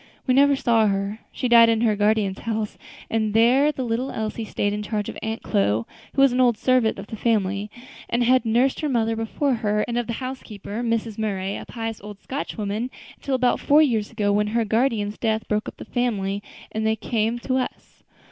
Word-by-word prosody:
We 255 - +2
never 280 +1 +5
saw 230 -4 +3
her; 200 +2 -1
she 255 - -2
died 230 -1 +7
in 225 -1 +2
her 220 -3 +3
guardian's 205 -2 +1
house, 220 -2 -3 0.3
and 220 -1 -1
there 255 +6 +5
the 265 -3 -4
little 240 +3 -1
Elsie 220 0 -4
stayed 205 -1 -1
in 210 - -3
charge 210 -1 -3
of - - -7
Aunt 220 0 -4
Chloe, 105 +3 +1 0.3
who 275 - +3
was 275 -3 +5
an 255 - +2
old 240 -3 +4
servant 255 -3 +2
in 195 - -7
the - - -6
family, 205 -2 0 0.4
and 240 +1 +1
had 255 +1 +4
nursed 240 +4 +2
her 305 - -1
mother 225 -3 +1
before 225 +5 -1
her, 210 -1 +1
and 240 0 -1
of 240 - -3
the 235 - -2
housekeeper, 230 -4 -6
Mrs. 230 -2 -1
Murray, 195 -2 -2
a - - -8
pious 225 -2 -5
old 205 0 -9
Scotch 270 +3 -5
woman, 215 +3 -2 0.3
until 275 - -2
about 250 -1 +2
four 300 +2 +5
years 225 -7 0
ago, 205 -3 0
when 210 +1 +2
her 230 +2 0
guardian's 220 -2 0
death 220 -1 -1
broke 210 0 -1
up - - -15
the - - -9
family, 205 -5 -1 0.3
and 220 - -2
then 220 0 +2
they - - -2
came 225 +1 -1
to 255 +2 -1
us. 255 - -5
225 Hz, 215 wpm, -23 LUFS, 210-245 Hz, 0.4 s, died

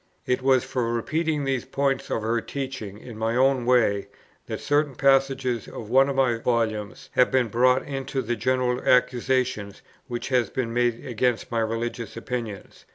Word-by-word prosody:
It 125 +1 0
was 130 -1 +3
for 125 -4 -2
repeating 155 +6 -1
these 135 -2 -1
points 135 0 -1
of 110 - -1
her 115 +1 0
teaching 130 -7 -5
in 110 0 -10
my 115 +1 0
own 130 -1 +2
way, 110 -6 +3 0.4
that - - -4
certain 145 -2 +1
passages 135 -4 +2
of 110 -1 -8
one 135 +2 +5
of 140 - -2
my 125 -4 +2
Volumes 110 -3 -2
have 125 - +4
been 130 -3 +2
brought 125 +4 +3
into 135 -1 -3
the 120 +1 -1
general 125 0 0
accusation 125 -4 +1 0.3
which 120 -1 -4
has 125 -3 +2
been 115 -3 -3
made 120 -1 0
against 125 -1 -1
my 115 - 0
religious 115 +1 -3
opinions. 115 -4 -6
125 Hz, 165 wpm, -25 LUFS, 115-135 Hz, 0.4 s, one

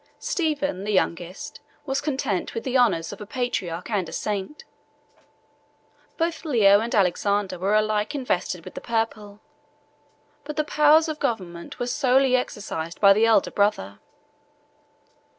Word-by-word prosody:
Stephen, 290 - -2
the 210 - -2
youngest, 180 -2 -2 0.3
was 270 -1 -1
content 265 - -2
with 230 - -3
the 260 -1 -3
honors 200 -9 +2
of 205 - -11
a - - -6
patriarch 195 -8 -3
and 190 -6 -1
a - - -10
saint; 205 +7 -4 1.5
both 330 -1 -1
Leo 215 -10 +5
and 230 +2 -2
Alexander 200 0 +1
were 195 +3 +1
alike 215 +3 0
invested 180 - -2
with - - -9
the - - -7
purple, 215 -3 -3 1.0
but 300 +1 -7
the 305 - +1
powers 300 +2 +4
of 310 -1 -4
government 185 -10 -4
were 245 - -2
solely 260 0 +3
exercised 200 -9 -4
by 200 -1 +7
the 220 +3 +3
elder 220 -4 +3
brother. 200 - 0
215 Hz, 140 wpm, -24 LUFS, 195-265 Hz, 1.5 s, by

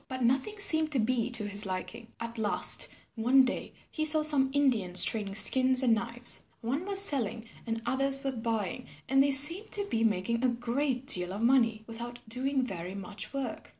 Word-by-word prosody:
But 260 -1 -6
nothing 265 - -1
seemed 315 -6 +5
to 265 - 0
be 240 +1 -1
to 225 -4 +1
his 205 0 +3
liking. 205 +5 -7
At 230 0 -8
last 210 -2 +3 0.3
one 250 +4 +2
day 260 - -6 0.2
he 310 - -4
saw 310 0 +4
some 285 -3 +3
Indians 235 -11 +3
trading 205 -3 -1
skins 255 +5 +2
and 240 -3 +2
knives. 235 +2 -1 0.2
One 275 +11 -4
was 395 -1 +4
selling 245 - 0 0.2
and 225 0 -5
others 275 +2 +1
were 270 - -2
buying 225 -1 -5 0.2
and 270 +1 +2
they 280 - +1
seemed 300 +10 +4
to 405 -1 +3
be 225 -1 -1
making 225 +3 -2
a 255 - +2
great 245 +2 -3
deal 180 -9 +2
of 200 +3 -7
money 230 -3 +1
without 235 +1 -9
doing 260 +3 -3
very 185 -4 -7
much 195 0 -7
work. 275 -2 -7
245 Hz, 185 wpm, -28 LUFS, 225-270 Hz, 0.3 s, seemed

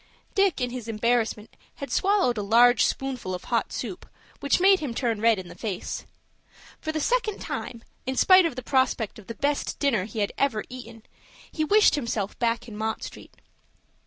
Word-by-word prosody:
Dick 395 -2 +2
in 245 -1 -1
his 245 -2 -6
embarrassment 225 -1 -1 0.2
had 280 - -7
swallowed 385 -11 +2
a 210 - -2
large 235 +4 +5
spoonful 255 -9 -3
of 180 - -8
hot - - -1
soup, - - -6 0.3
which 280 - +2
made 385 +1 +5
him 270 -7 -4
turn 230 -5 -1
red 230 -1 +4
in 185 -1 -7
the - - -10
face. 205 -6 -5 0.7
For 315 - -3
the 315 - -2
second 440 +3 0
time, 230 -2 -5 0.2
in 260 - -1
spite 370 +4 +6
of 300 - -6
the 255 - -6
prospect 260 -5 0
of 205 - -15
the 230 - -6
best 285 +3 -1
dinner 230 -10 +1
he 220 +1 -10
had 205 -2 0
ever 235 -7 +1
eaten, 235 -3 -10 0.5
he 310 - -1
wished 420 +7 +5
himself 230 -8 -2
back 235 0 0
in 220 - -9
Mott 220 +1 -3
Street. - - -10
245 Hz, 190 wpm, -26 LUFS, 220-285 Hz, 0.7 s, spite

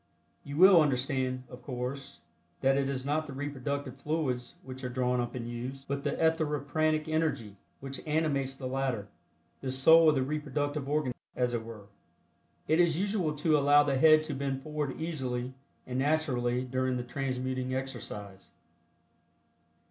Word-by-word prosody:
You 140 +1 -6
will 185 -1 +8
understand, 130 -2 0
of 125 0 -11
course, 135 +2 -5 0.4
that 135 0 +4
it 140 0 +1
is 130 -1 -3
not 155 +2 0
the 140 - -7
reproductive 140 -1 -4
fluids 135 -5 -2
which 130 0 -9
are 125 - -2
drawn 125 0 0
up 120 - -4
and 120 -2 -4
used, 125 +3 -6
but 140 0 -3
the - - 0
etheripranic 155 -1 +1
energy 155 -10 -1 0.3
which 135 0 -6
animates 145 -4 0
the 135 - -8
latter, 130 -6 -2 0.5
the 135 - -4
soul 160 +5 +6
of 150 - +3
the 135 - +2
reproductive 145 0 -2
organism, 145 -4 -1 0.2
as 125 -1 0
it 115 -2 -1
were. 110 -3 -10 0.8
It 160 +2 +3
is 170 -3 +4
usual 195 -6 0
to 155 +1 +2
allow 145 +1 +6
the 140 -2 0
head 155 +1 +7
to 155 -1 -4
bend 135 -1 -3
forward 150 -3 -3
easily 130 -6 -3 0.3
and 125 0 -3
naturally 130 -4 +1
during 130 0 -1
the 125 - -3
transmuting 130 0 -2
exercise. 105 -7 -6
135 Hz, 155 wpm, -30 LUFS, 125-150 Hz, 0.8 s, will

